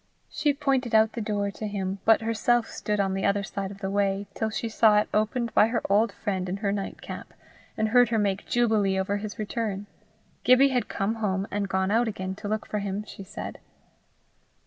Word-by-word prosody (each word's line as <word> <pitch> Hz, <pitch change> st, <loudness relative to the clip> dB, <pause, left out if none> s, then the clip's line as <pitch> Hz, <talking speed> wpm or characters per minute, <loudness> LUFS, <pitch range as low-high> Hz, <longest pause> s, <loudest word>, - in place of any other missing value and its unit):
She 295 Hz, -1 st, +1 dB
pointed 270 Hz, -5 st, 0 dB
out 220 Hz, 0 st, +5 dB
the 235 Hz, -, -5 dB
door 205 Hz, -2 st, -1 dB
to 215 Hz, +2 st, -5 dB
him, 195 Hz, -1 st, -3 dB
but 225 Hz, 0 st, +5 dB
herself 230 Hz, +1 st, +1 dB
stood 210 Hz, -1 st, -3 dB
on 195 Hz, -1 st, +1 dB
the 195 Hz, -, -2 dB
other 200 Hz, 0 st, +2 dB
side 195 Hz, 0 st, -4 dB
of 200 Hz, 0 st, -11 dB
the 195 Hz, -, -2 dB
way 200 Hz, 0 st, +1 dB
till 220 Hz, -, -1 dB
she 225 Hz, +2 st, -3 dB
saw 220 Hz, -1 st, +4 dB
it 210 Hz, -, +2 dB
opened 225 Hz, +2 st, 0 dB
by 215 Hz, -, +6 dB
her 230 Hz, 0 st, -1 dB
old 210 Hz, +2 st, +4 dB
friend 190 Hz, -3 st, -3 dB
in 190 Hz, -, -2 dB
her 200 Hz, -1 st, -1 dB
night 200 Hz, -1 st, -4 dB
cap, -, -, -8 dB, 0.4 s
and 220 Hz, 0 st, +1 dB
heard 245 Hz, +2 st, +5 dB
her 230 Hz, -, +1 dB
make 200 Hz, -2 st, 0 dB
jubilee 220 Hz, -5 st, +2 dB
over 200 Hz, +2 st, 0 dB
his 205 Hz, 0 st, -6 dB
return. 210 Hz, -2 st, -3 dB, 0.6 s
Gibbie 255 Hz, +2 st, +6 dB
had 250 Hz, -2 st, 0 dB
come 210 Hz, +3 st, -1 dB
home 195 Hz, -1 st, 0 dB
and 200 Hz, -1 st, -2 dB
gone 190 Hz, 0 st, 0 dB
out 230 Hz, +2 st, +3 dB
again 190 Hz, -3 st, -3 dB
to 210 Hz, -, -6 dB
look 215 Hz, +1 st, -2 dB
for 210 Hz, -, -3 dB
him, 200 Hz, +1 st, -3 dB
she 200 Hz, -, -10 dB
said. 190 Hz, -, -7 dB
210 Hz, 215 wpm, -26 LUFS, 195-225 Hz, 0.6 s, by